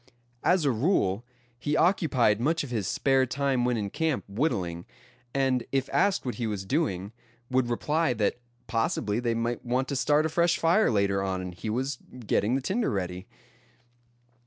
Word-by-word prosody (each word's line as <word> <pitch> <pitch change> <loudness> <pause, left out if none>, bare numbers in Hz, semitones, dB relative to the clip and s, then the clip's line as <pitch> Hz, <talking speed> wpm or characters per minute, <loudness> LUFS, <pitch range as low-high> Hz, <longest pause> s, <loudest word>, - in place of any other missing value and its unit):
As 180 -4 +3
a 140 - +4
rule, 115 - +1 0.4
he 150 +4 0
occupied 130 - +3
much 165 +5 +1
of 135 - -7
his 105 -6 -1
spare 135 -1 +2
time 135 0 0
when 125 -1 +1
in 100 -2 -3
camp 160 -4 0
whittling; 100 - -2 0.4
and 130 -2 +1
if 135 -1 0
asked 200 -7 +2
what 125 - -2
he 115 - 0
was 100 -3 -3
doing, 100 - -1 0.4
would 130 -1 +2
reply 150 +4 +1
that 110 +1 0 0.3
possibly 115 -2 0
they 120 -1 0
might 115 +1 -2
want 125 +2 0
to 140 - -1
start 150 +3 +3
a - - +1
fresh 170 +2 +2
fire 170 +6 +3
later 100 -3 +1
on, 95 -1 -1
and 90 -1 -5
he 90 +5 -6
was 130 +4 -2 0.3
getting 105 +4 +1
the 135 - 0
tinder 215 - 0
ready. 90 -1 -3
125 Hz, 175 wpm, -27 LUFS, 105-145 Hz, 0.4 s, a